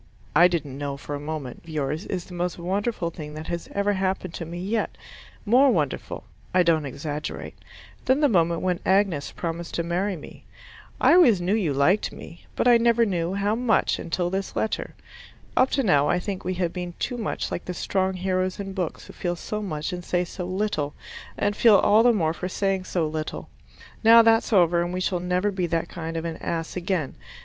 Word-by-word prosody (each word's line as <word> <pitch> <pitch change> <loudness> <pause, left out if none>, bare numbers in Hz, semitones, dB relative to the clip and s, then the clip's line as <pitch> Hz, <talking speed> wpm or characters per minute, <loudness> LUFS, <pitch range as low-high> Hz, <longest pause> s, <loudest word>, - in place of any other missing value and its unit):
I 175 +4 +8
didn't 150 -6 -3
know 140 -1 -3
for 145 - -7
a 145 - -3
moment. 145 -4 -5
But - - -20
this 160 - -8
letter 150 - 0
of 135 - -2
yours 160 +6 -4
is 180 -3 -3
the 180 - -12
most 175 0 -2
wonderful 185 0 -2
thing 150 -2 -8
that 155 +1 -6
has 170 -1 -4
ever 200 +1 +1
happened 190 -2 -2
to 170 - -5
me 170 +2 -7
yet 210 +5 -2 0.5
more 255 +6 +5
wonderful - - -1 0.3
(I 185 - +6
don't 160 -4 +2
exaggerate) 145 +3 -5 0.5
than 260 +2 +3
the 300 - +5
moment 170 -7 +2
when 180 -1 0
Agnes 190 -7 +1
promised 170 0 -5
to 170 - 0
marry 180 +4 -1
me. 150 - -12 0.6
I - - +5
always 255 - +6
knew 180 +3 0
you 200 -9 +1
liked 140 +10 +2
me, 170 - -12
but - - +1
I 240 -1 +7
never 235 0 +4
knew 180 -2 -1
how 200 +1 +1
much 235 0 +1
until 175 +1 -2
this 195 0 -3
letter. 220 - -2 0.6
Up 255 - +4
to 270 - +2
now 150 - +4
I - - +3
think 190 +1 -4
we 185 +1 -2
have 175 -2 -1
been 180 -1 -5
too 245 - -3
much 220 - -3
like - - -4
the 180 - -5
strong 190 +1 0
heroes 185 0 -1
in 195 -1 -5
books 180 -4 -4
who - - -12
feel 175 -1 -2
so 210 +4 -4
much 155 -5 -3
and 180 0 -5
say 180 0 0
so 180 +1 -6
little, 185 -6 -2 0.4
and 205 0 0
feel 225 -2 +6
all 210 +2 +5
the 240 +1 +6
more 165 -8 +1
for 180 +2 -5
saying 195 -1 -1
so 170 -4 0
little. 155 0 -5 0.5
Now 230 +1 +8
that's 225 +1 +3
over 175 -4 +4
and 175 +1 -2
we - - -1
shall 185 -1 0
never 180 +3 0
be 185 -2 -1
that 165 0 -1
kind 165 0 -5
of 165 - -3
an 165 -1 -4
ass 165 -1 -4
again. 180 -5 -1
180 Hz, 215 wpm, -25 LUFS, 165-200 Hz, 0.6 s, I